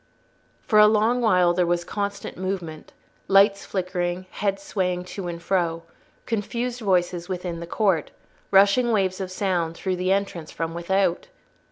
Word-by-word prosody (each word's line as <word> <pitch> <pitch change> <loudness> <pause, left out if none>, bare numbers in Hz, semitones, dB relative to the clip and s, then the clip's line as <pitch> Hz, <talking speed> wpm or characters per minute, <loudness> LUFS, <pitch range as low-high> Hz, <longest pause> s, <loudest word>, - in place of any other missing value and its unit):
For 215 -4 +3
a 210 - +9
long 220 +3 +2
while 180 -6 +4
there 175 0 +1
was 175 0 0
constant 200 +1 -4
movement, 180 -4 -5 0.4
lights 200 +1 +4
flickering, 180 -1 -2
heads 195 -1 -2
swaying 180 -3 -1
to 195 -3 -5
and 170 -1 -5
fro, 170 -2 -1 0.4
confused 235 +3 -3
voices 180 -3 0
within 180 -2 -4
the 170 - -7
court, 185 -5 +1 0.4
rushing 200 +5 +4
waves 195 -3 0
of 190 - -4
sound 180 -4 -1
through 185 +1 -2
the 185 +1 0
entrance 195 -5 -1
from 165 0 -4
without. 175 +1 0
185 Hz, 150 wpm, -24 LUFS, 175-200 Hz, 0.4 s, a